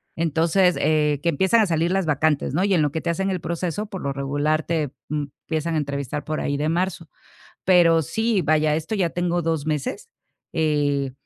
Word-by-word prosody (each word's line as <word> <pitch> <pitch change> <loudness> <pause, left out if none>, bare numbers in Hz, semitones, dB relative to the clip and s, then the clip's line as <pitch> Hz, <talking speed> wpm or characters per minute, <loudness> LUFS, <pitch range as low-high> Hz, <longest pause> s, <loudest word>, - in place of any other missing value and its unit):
Entonces, 170 +3 +2
eh, 150 -2 +2
que 170 - +2
empiezan 190 +8 +3
a - - +4
salir 170 -1 0
las 190 -2 +1
vacantes, 150 -1 +1
¿no? 175 +5 +1
Y 200 -1 +2
en 165 - +3
lo 150 - +1
que 160 - -2
te 170 - -3
hacen 195 +3 0
el 185 - -1
proceso, 170 +5 -3
por 190 -3 -7
lo 140 - -2
regular, 145 +3 0
te, 155 -4 -1 0.2
mm, 150 0 -1 0.2
empiezan 160 +1 -1
a - - +2
entrevistar 140 -1 -3
por 155 0 -2
ahí 145 0 -1
de 150 +2 -1
marzo. 170 -1 -2 0.6
Pero 170 -3 +5
sí, 220 +6 0
vaya, 155 -2 +2
esto 160 +7 -3
ya 185 -4 +1
tengo 175 0 -1
2 160 -3 -1
meses. 155 - -3 0.4
Eh, 145 -4 +1
160 Hz, 205 wpm, -23 LUFS, 150-175 Hz, 0.6 s, Pero